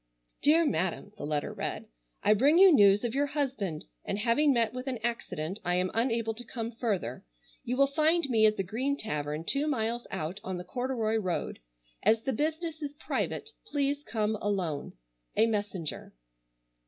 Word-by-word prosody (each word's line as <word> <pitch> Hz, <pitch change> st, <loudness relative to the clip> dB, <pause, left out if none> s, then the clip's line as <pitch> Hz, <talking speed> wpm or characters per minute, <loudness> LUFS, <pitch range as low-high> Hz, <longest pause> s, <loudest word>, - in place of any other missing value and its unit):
"DEAR 325 Hz, +3 st, +5 dB
MADAM:" 185 Hz, -, -1 dB
the 145 Hz, -, -5 dB
letter 150 Hz, -1 st, -1 dB
read, -, -, -4 dB, 0.4 s
"I 210 Hz, -, +6 dB
bring 280 Hz, +10 st, +4 dB
you 380 Hz, 0 st, +9 dB
news 205 Hz, -4 st, +6 dB
of 235 Hz, -1 st, -1 dB
your 285 Hz, +2 st, +1 dB
husband, 260 Hz, -, -2 dB, 0.2 s
and -, -, -2 dB
having 235 Hz, +7 st, +3 dB
met 235 Hz, -3 st, +2 dB
with 255 Hz, +1 st, -6 dB
an 260 Hz, -2 st, -1 dB
accident 190 Hz, -6 st, -3 dB
I 175 Hz, 0 st, +1 dB
am 180 Hz, +1 st, +1 dB
unable 230 Hz, -1 st, +1 dB
to 235 Hz, +2 st, -7 dB
come 230 Hz, -1 st, -5 dB
further. 205 Hz, -, -2 dB, 0.4 s
You 250 Hz, +2 st, -2 dB
will 275 Hz, -, +6 dB
find 315 Hz, +4 st, +2 dB
me 220 Hz, -4 st, +5 dB
at 215 Hz, -, +1 dB
the 195 Hz, -, 0 dB
Green 255 Hz, +9 st, -1 dB
Tavern 150 Hz, -, -3 dB
two 280 Hz, -, +1 dB
miles 240 Hz, -4 st, -1 dB
out 160 Hz, +6 st, -4 dB
on 185 Hz, -1 st, -3 dB
the 180 Hz, -, -5 dB
corduroy 235 Hz, +1 st, -1 dB
road. 185 Hz, -5 st, -2 dB, 0.4 s
As 225 Hz, 0 st, +3 dB
the 265 Hz, -, -1 dB
business 315 Hz, +4 st, -2 dB
is 290 Hz, -1 st, -5 dB
private, 440 Hz, +7 st, -3 dB, 0.2 s
please 285 Hz, -3 st, 0 dB
come 215 Hz, -3 st, -1 dB
alone. 185 Hz, -8 st, -2 dB, 0.4 s
"A 225 Hz, -, +6 dB
MESSENGER." 205 Hz, -, -3 dB
225 Hz, 175 wpm, -29 LUFS, 195-275 Hz, 0.4 s, you